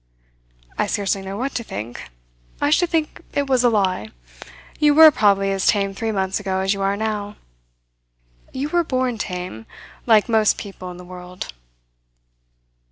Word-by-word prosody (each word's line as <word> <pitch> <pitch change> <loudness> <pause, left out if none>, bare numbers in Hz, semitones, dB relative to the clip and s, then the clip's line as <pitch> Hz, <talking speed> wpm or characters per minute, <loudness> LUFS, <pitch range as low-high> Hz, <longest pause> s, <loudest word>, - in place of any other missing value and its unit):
"I - - +2
scarcely 200 -2 -1
know 195 +1 -6
what 265 +4 -3
to 235 - -3
think. 105 - -7 0.5
I 290 - +1
should 350 +2 +3
think 320 -3 -1
it 285 - +1
was 260 -2 +2
a 245 - +5
lie. 190 - 0 0.7
You 295 -1 +4
were 315 0 +10
probably 200 -5 +2
as 195 -1 0
tame 200 -2 +2
three 225 +3 -2
months 190 -1 -1
ago 190 -2 -2
as 190 +1 +1
you 200 - -5
are 195 +1 +1
now. 210 -1 -3 1.2
You 275 +3 -3
were 345 +1 +2
born 255 -6 -1
tame, 180 - -5 0.4
like 220 -1 +5
most 220 -3 +3
people 190 -2 -8
in 180 - -9
the 180 - -11
world." 180 - -9
205 Hz, 165 wpm, -21 LUFS, 190-250 Hz, 1.2 s, were